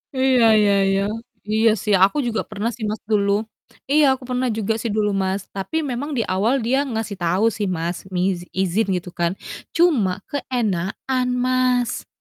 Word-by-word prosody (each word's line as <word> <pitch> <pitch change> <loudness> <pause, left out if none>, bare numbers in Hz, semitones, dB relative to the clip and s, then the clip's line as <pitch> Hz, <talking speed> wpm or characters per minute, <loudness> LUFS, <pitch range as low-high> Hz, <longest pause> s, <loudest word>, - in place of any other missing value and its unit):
Iya 260 -2 +3 0.2
iya 205 -1 +4 0.2
iya. 195 0 +2 0.5
Iya 220 +1 +4
sih, 210 -2 +1
aku 200 +9 +3
juga 225 -2 -1
pernah 215 +2 -2
sih 230 - -8
Mas, 215 0 -3
dulu. 200 -1 +3 0.6
Iya, 300 +1 +5
aku 260 - -14
pernah 250 0 0
juga 220 0 0
sih 230 - -3
dulu 210 -1 +1
Mas, 190 +1 -1
tapi 195 - -3
memang 280 +2 -3
di 230 - +1
awal 200 +6 +1
dia 255 +4 +2
ngasih 220 -2 -3
tahu 180 +5 +1
sih 205 -2 -2
Mas, 175 -1 -2 0.2
mizi 180 -1 0
izin 190 +3 +1
gitu 180 0 -5
kan. 170 0 +2 0.4
Cuma 230 - +2
keenakan, 250 -1 -1 0.2
Mas. 255 -1 +1
215 Hz, 165 wpm, -21 LUFS, 190-250 Hz, 0.6 s, Iya